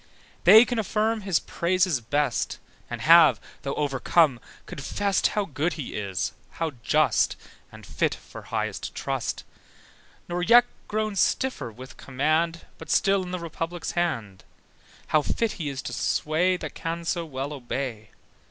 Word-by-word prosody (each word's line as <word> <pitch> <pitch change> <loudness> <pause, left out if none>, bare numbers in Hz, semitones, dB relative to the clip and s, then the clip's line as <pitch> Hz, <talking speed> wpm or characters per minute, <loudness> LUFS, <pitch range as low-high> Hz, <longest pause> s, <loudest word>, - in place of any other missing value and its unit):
They 220 +3 +9
can 245 -2 -2
affirm 220 +1 0
his 190 -4 +1
praises 175 -5 0
best, 140 +2 -1 0.3
And 120 -1 -5
have, 160 -5 +7 0.2
though 140 0 -3
overcome, 145 -1 +2 0.3
confessed 195 +8 0
How 210 -1 -1
good 155 +1 -1
he 150 -6 -6
is, 95 -3 -2 0.3
how 165 -1 -1
just, - - +2 0.4
And - - -12
fit - - 0
for - - -12
highest - - -4
trust: - - -3 0.8
Nor 175 0 -2
yet 235 +6 +7 0.2
grown 215 -1 -1
stiffer 255 - 0
with 130 +4 -12
command, 155 +5 0
But - - -10
still 195 -1 +3
in 180 - -6
the 180 - -3
Republic's 170 0 -4
hand: 115 - -2 0.7
How 155 - +4
fit 225 +8 -1
he 155 -5 -4
is 135 -1 -5
to - - -5
sway 175 +4 +1
That - - -7
can 170 +1 -4
so 170 0 -1
well 140 -2 -5
obey. 120 -4 -5
165 Hz, 145 wpm, -26 LUFS, 135-185 Hz, 0.8 s, They